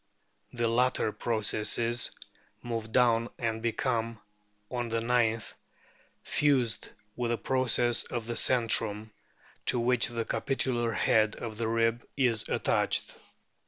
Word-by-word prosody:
The 120 -1 -1
latter 120 -1 +1
processes 115 +2 0 0.5
move 115 -2 -4
down 115 -1 +3
and 115 -2 -2
become 115 -1 -2 0.5
(on 120 -2 -3
the 115 0 -1
ninth) 115 -1 0 0.7
fused 130 -6 +1 0.3
with 120 -1 -2
the 120 - 0
process 120 -2 +2
of 120 -3 -5
the 120 0 -4
centrum, 110 -3 +2 0.6
to 125 - +5
which 120 0 +2
the 115 -1 -4
capitular 120 -4 -1
head 110 -2 +2
of 110 -2 -7
the 115 - -1
rib 115 +1 0
is 120 -5 +1
attached. - - 0
115 Hz, 120 wpm, -29 LUFS, 115-120 Hz, 0.7 s, to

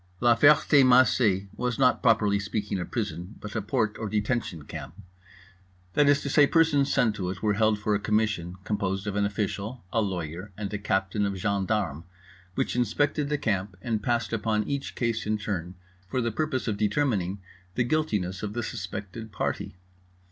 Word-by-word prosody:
La 120 +1 +5
Ferté 145 +2 +6
Macé 125 -6 +4
was 125 +1 -2
not 130 -2 +3
properly 105 -3 +3
speaking 100 0 -3
a 90 - -3
prison, 90 -3 -4
but 105 - -8
a 110 - 0
Porte 110 0 -1
or 110 - -3
Detention 105 - -1
Camp: 80 - -8 1.0
that 145 -1 +4
is 145 0 +4
to - - -3
say, 140 +1 +5
persons 155 -4 +3
sent 115 -3 +3
to 90 -3 -3
it 90 0 -6
were 105 -1 +3
held 110 0 +2
for 105 0 -1
a 100 - +2
Commission, 105 -5 0
composed 100 -2 -2
of 100 -1 -3
an 100 0 +2
official, 105 +3 -3
a 115 - +3
lawyer, 90 -1 -4
and 105 -1 -4
a 105 - -2
captain 95 0 0
of 100 -1 -1
gendarmes, 100 -5 -1 0.5
which - - -1
inspected 140 +5 +1
the 150 - +1
Camp 100 -5 -2
and 110 +1 -2
passed 120 +1 -1
upon 105 -1 0
each 140 -1 -3
case 115 -3 -1
in 110 0 +1
turn 95 -4 -4 0.3
for 125 - -1
the 115 -1 0
purpose 135 0 -2
of 105 -2 -1
determining 105 -4 0 0.4
the 125 - +2
guiltiness 105 - -1
of 105 -1 -4
the 120 +1 -2
suspected 105 +1 -6
party. 90 - -3
105 Hz, 180 wpm, -27 LUFS, 100-120 Hz, 1.0 s, Ferté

